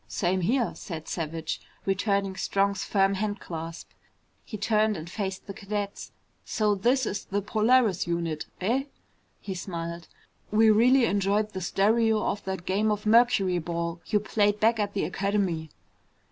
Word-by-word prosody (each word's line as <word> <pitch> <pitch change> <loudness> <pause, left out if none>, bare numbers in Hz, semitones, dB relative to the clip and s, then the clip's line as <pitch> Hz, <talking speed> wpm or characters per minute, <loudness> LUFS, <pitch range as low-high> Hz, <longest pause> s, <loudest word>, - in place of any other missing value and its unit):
"Same 185 0 0
here," 235 +6 +1
said 165 -5 -7
Savage, 165 -1 -3 0.2
returning 195 0 0
Strong's 200 +1 0
firm 195 -1 +2
handclasp. 180 -5 -4 0.6
He 215 - -7
turned 215 0 +2
and 160 +1 -7
faced 190 0 -4
the 200 - -7
cadets. 205 0 -5 0.3
"So 210 -1 +1
this 245 +6 +2
is 200 - -3
the 200 - -1
Polaris 215 -2 +2
unit, 170 -2 -2
eh?" 245 +8 +1 0.5
He 195 - -5
smiled. 170 -2 -5 0.4
"We've 215 0 +5
really 250 +3 +5
enjoyed 205 +1 +1
the 190 - -4
stereo 220 +4 +2
of 205 - -2
that 190 -2 -4
game 205 +3 +1
of 210 0 -1
mercuryball 180 -7 +2
you 210 - +2
played 205 0 +1
back 225 +1 +3
at 205 -1 -1
the 195 - 0
Academy." 190 -3 -1
200 Hz, 145 wpm, -27 LUFS, 180-215 Hz, 0.6 s, We've